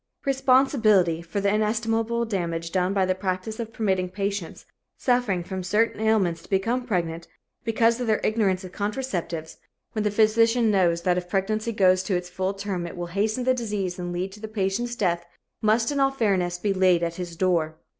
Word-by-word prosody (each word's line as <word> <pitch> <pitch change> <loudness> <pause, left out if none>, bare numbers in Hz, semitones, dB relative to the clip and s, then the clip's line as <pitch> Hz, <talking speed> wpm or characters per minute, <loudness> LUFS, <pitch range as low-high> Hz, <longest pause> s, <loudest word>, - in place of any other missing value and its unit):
Responsibility 255 - +3
for 175 +4 -4
the 200 0 +1
inestimable 225 +2 0
damage 170 -5 -3
done 185 0 +1
by 195 -1 +2
the 185 - +1
practice 185 +3 -3
of 225 -1 -4
permitting 190 -5 0
patients 200 -1 -4 0.3
suffering 245 -8 +1
from 190 +1 -5
certain 210 +4 +1
ailments 195 -7 +2
to - - -18
become 230 +6 0
pregnant, 170 -5 -2 0.4
because 230 +1 +2
of 245 - -2
their 215 -1 +2
ignorance 205 -4 +1
of 185 - -8
contraceptives, 185 -8 -4 0.3
when 215 - -2
the 210 - +2
physician 225 +2 +3
knows 170 -4 +2
that 180 -1 +2
if 180 0 -11
pregnancy 215 +4 -1
goes 185 -3 +4
to 185 0 -1
its 180 0 -3
full 190 +2 -2
term 195 -3 -3
it 170 - -9
will 175 - -3
hasten 215 +5 0
the 255 +1 +3
disease 205 -7 -3
and 175 0 -4
lead 180 +2 -3
to 210 - -12
the 220 - -6
patient's 215 +3 -2
death, 175 -5 0 0.4
must 225 +4 +2
in 285 - -1
all 270 0 +4
fairness 195 -9 0
be 200 +2 0
laid 185 -2 +3
at 170 0 -2
his 175 -2 -5
door. 165 -3 0
200 Hz, 190 wpm, -25 LUFS, 180-225 Hz, 0.4 s, goes